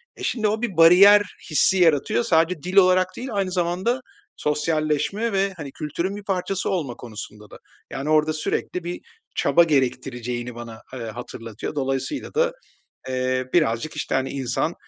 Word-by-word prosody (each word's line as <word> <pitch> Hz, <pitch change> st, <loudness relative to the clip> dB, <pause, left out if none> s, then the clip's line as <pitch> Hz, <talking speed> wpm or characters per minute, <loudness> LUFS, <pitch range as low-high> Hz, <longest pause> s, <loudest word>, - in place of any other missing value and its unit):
E, -, -, -10 dB
şimdi 220 Hz, -4 st, 0 dB
o 215 Hz, +1 st, -1 dB
bir 215 Hz, -8 st, -3 dB
bariyer 190 Hz, +5 st, +8 dB, 0.3 s
hissi 190 Hz, +5 st, +3 dB
yaratıyor, 170 Hz, -, +3 dB
sadece 165 Hz, -5 st, +2 dB
dil 180 Hz, +1 st, -4 dB
olarak 185 Hz, -1 st, +6 dB
değil 255 Hz, +2 st, -5 dB
aynı 195 Hz, -3 st, -1 dB
zamanda 185 Hz, +8 st, 0 dB, 0.3 s
sosyalleşme 155 Hz, +8 st, 0 dB
ve, 195 Hz, 0 st, +1 dB
hani, 145 Hz, -4 st, -7 dB
kültürün 170 Hz, +7 st, -3 dB
bir 205 Hz, -, -8 dB
parçası 195 Hz, -1 st, -2 dB
olma 150 Hz, -10 st, -2 dB
konusunda 105 Hz, -2 st, -9 dB
da. -, -, -12 dB, 0.3 s
Yani, 140 Hz, +3 st, -4 dB
orada 155 Hz, 0 st, +3 dB
sürekli 165 Hz, +3 st, -3 dB
bir 175 Hz, +1 st, -5 dB, 0.3 s
çaba 170 Hz, -, +4 dB
gerektireceğini 125 Hz, -4 st, -1 dB
bana, 115 Hz, -1 st, -9 dB
eee, 130 Hz, -, -6 dB
hatırlatıyor, 115 Hz, +1 st, -7 dB
dolayısıyla 135 Hz, -, -3 dB
da, -, -, +2 dB, 0.6 s
eee, 130 Hz, 0 st, -1 dB
birazcık, 150 Hz, -2 st, +1 dB
işte, 145 Hz, -, -3 dB
hani, 135 Hz, 0 st, 0 dB
insan, 135 Hz, +4 st, -2 dB
155 Hz, 155 wpm, -23 LUFS, 130-190 Hz, 0.6 s, bariyer